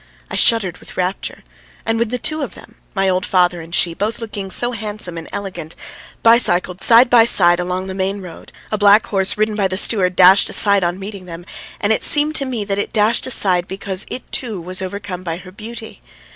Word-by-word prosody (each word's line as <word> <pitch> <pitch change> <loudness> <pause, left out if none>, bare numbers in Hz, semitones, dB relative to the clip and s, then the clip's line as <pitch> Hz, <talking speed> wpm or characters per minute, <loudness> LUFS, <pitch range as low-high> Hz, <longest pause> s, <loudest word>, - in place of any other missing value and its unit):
I - - -4
shuddered 195 -7 +2
with - - -15
rapture, 185 +1 -4 0.4
and 225 0 -1
when 235 -1 -1
the 250 - -3
two 310 +5 0
of 275 - -6
them, - - -16 0.2
my 195 0 0
old 185 0 0
father 180 -2 0
and 165 - -12
she, 170 - +1
both 210 +6 -3
looking 210 -4 -6
so 240 +5 +2
handsome 210 -5 -3
and 165 -1 -9
elegant, 175 -5 -7 0.5
bicycled 185 -6 +2
side 235 +2 +5
by 240 -1 +5
side 175 -6 +4
along 180 +1 -3
the 190 - -6
main 195 +1 -3
road, 180 -4 -12 0.2
a 215 - -2
black 205 +2 +4
horse 195 -3 -1
ridden 215 0 -1
by 200 -2 0
the 185 0 -4
steward 185 -4 +4
dashed 185 +2 +5
aside 200 -2 +5
on 175 +1 -2
meeting 195 -1 -9
them, 170 0 -10 0.3
and 215 -1 +1
it - - -1
seemed 300 +1 +3
to 275 - -1
me 245 -5 -4
that 200 0 -3
it - - -3
dashed 220 +3 +1
aside 185 -7 +2
because 195 0 -4
it 255 - -6
too 225 -7 -3
was 185 +3 -2
overcome 185 -1 -6
by 170 -2 -5
her 185 0 -13
beauty. 220 - -10
195 Hz, 215 wpm, -17 LUFS, 180-220 Hz, 0.5 s, side